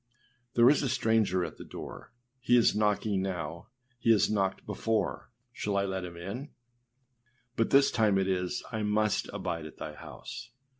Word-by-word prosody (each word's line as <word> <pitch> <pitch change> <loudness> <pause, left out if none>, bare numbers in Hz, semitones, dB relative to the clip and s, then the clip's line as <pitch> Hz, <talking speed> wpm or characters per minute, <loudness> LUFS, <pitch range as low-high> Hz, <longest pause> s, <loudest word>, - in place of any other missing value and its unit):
there 120 0 +7
is 145 - +5
a 135 - 0
stranger 110 -7 +2
at - - -8
the - - -8
door; - - -9 0.3
he 125 0 +4
is 120 - +4
knocking 105 -1 +1
now; 85 -4 -4 0.3
he 115 - 0
has 110 -1 +4
knocked 95 -2 0
before; 110 -1 -1 0.2
shall 100 -3 -2
I 100 - +2
let 95 -1 -3
him 85 -1 -9
in?â 105 - -6 1.1
But 115 - +1
this 140 0 +5
time 110 -4 +3
it 95 -1 +1
is, 90 -1 -1
âI 110 -1 -2
must 105 0 +1
abide 90 -5 -3
at - - -14
thy 75 - -6
house. 80 - -9
105 Hz, 170 wpm, -30 LUFS, 90-115 Hz, 1.1 s, there